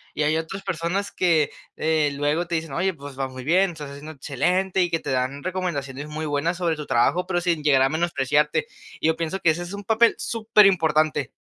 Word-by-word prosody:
y 150 - 0
hay 155 +2 +2
otras 195 +5 -5
personas 185 +3 -2
que, 160 -5 +2 0.3
eh, 155 -2 +2
luego 150 +4 0
te 170 - -2
dicen: 160 -3 -3
"Oye, 185 +4 0
pues 140 -2 -10
va 135 - 0
muy 130 -1 -9
bien, 180 +5 +3
estás 150 -3 -8
haciendo 150 +3 -9
excelente", 180 +8 0
y 175 - +2
que 165 - +1
te - - -5
dan 130 +2 -1
recomendaciones 150 -7 -3
muy 155 +1 -4
buenas 155 +4 -1
sobre 170 -3 0
tu 150 - -7
trabajo, 155 +9 +2
pero 175 -2 0
sin 170 -3 0
llegar 135 -3 +4
a 135 - +3
menospreciarte. 150 -1 +1 0.4
Yo 160 0 +2
pienso 165 +3 -3
que 160 - +4
ese 170 +3 -3
es 175 +3 -8
un 200 0 -6
papel 225 +3 +3
superimportante. 170 - +3
160 Hz, 210 wpm, -24 LUFS, 145-180 Hz, 0.4 s, llegar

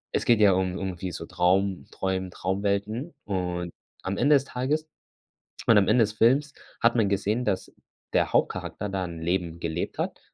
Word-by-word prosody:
Es - - 0
geht 120 -2 +4
ja 105 -2 +7
um 95 -1 +1
um - - -4
irgendwie 95 -1 -4
so - - -6
Traum 95 +2 +1
träumen 95 -1 -2
Traumwelten 100 - -2
und 90 -3 -2 0.3
am 95 +1 -2
Ende 145 +4 +5
des 135 - +3
Tages 145 +5 -1 0.8
und 115 - +6
am 95 - +2
Ende 125 - +5
des 105 0 -2
Films 135 +7 +3 0.3
hat 115 +1 +4
man 110 -4 +3
gesehen, 100 +4 0
dass 100 -3 -1 0.4
der - - +2
Hauptcharakter 105 - 0
da 95 -1 -2
'n 85 -2 -7
Leben 85 -1 -1
gelebt 85 0 -3
hat - - -3
100 Hz, 180 wpm, -26 LUFS, 90-115 Hz, 0.8 s, ja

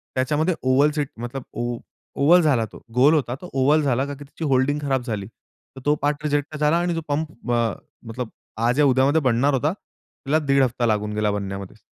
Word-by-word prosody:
त्याच्यामध्ये 150 +7 +1
oval 135 +3 +3
seat 145 -3 -1
मतलब 120 +2 -5
ओ 120 0 -2 0.4
oval 170 +6 +5
झाला 135 -8 +2
तो. - - -14
गोल 140 +5 +5
होता 130 -6 0
तो 180 - -9
ओव्हल 145 +4 +3
झाला 135 -1 +1
कारण 140 -1 -6
की 145 - -10
त्याची 145 +3 -9
होल्डिंग 135 +3 +2
खराब 135 -3 0
झाली. 105 -5 -4
तर 130 +3 -19
तो 150 +1 +3
पार्ट 145 +1 0
रिजेक्ट 145 0 -1
झाला 150 +2 +2
आणि 175 0 0
जो 165 - -2
पंप 150 -4 -3
अ, 115 -2 +2 0.4
मतलब 115 +1 -5 0.4
आज 125 +4 +1
या 150 - +6
उद्यामध्ये 135 +4 +3
बनणार 135 +5 +2
होता, 145 +6 +1
तिला 155 -6 -4
1.5 140 -2 +2
हफ्ता 125 -1 0
लागून 105 -1 0
गेला 105 -1 +1
बनण्यामध्ये. 100 0 -5
135 Hz, 200 wpm, -23 LUFS, 120-150 Hz, 0.4 s, या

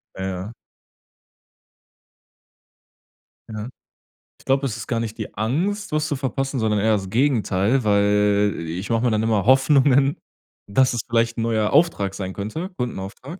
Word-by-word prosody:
Ja. 95 - -5
Ja. 95 +3 -4 3.0
Ja. 110 +2 -5 0.7
Ich - - -21
glaub, 135 +1 +1
es 115 -5 -2
ist 110 - -7
gar 115 - -1
nicht 115 0 -4
die 110 - -6
Angst, 180 - -1
was 155 0 0
zu 145 - -1
verpassen, 135 0 -2
sondern 110 -1 +1
eher 110 +2 +2
das 95 -2 -2
Gegenteil, 120 -2 +1
weil 105 0 +2
i 85 +1 -5
ich 100 - -7
mach 115 -1 +1
mir 120 -2 +1
dann 110 0 +1
immer 110 -3 +1
Hoffnungen, 135 +2 +4 0.5
dass 130 +5 +2
es 120 - -1
vielleicht 115 0 +1
'n - - -1
neuer 110 -2 0
Auftrag 145 - +2
sein 95 -1 -5
könnte 110 - -5
Kundenauftrag. 125 - -6
115 Hz, 155 wpm, -22 LUFS, 105-135 Hz, 3.0 s, Hoffnungen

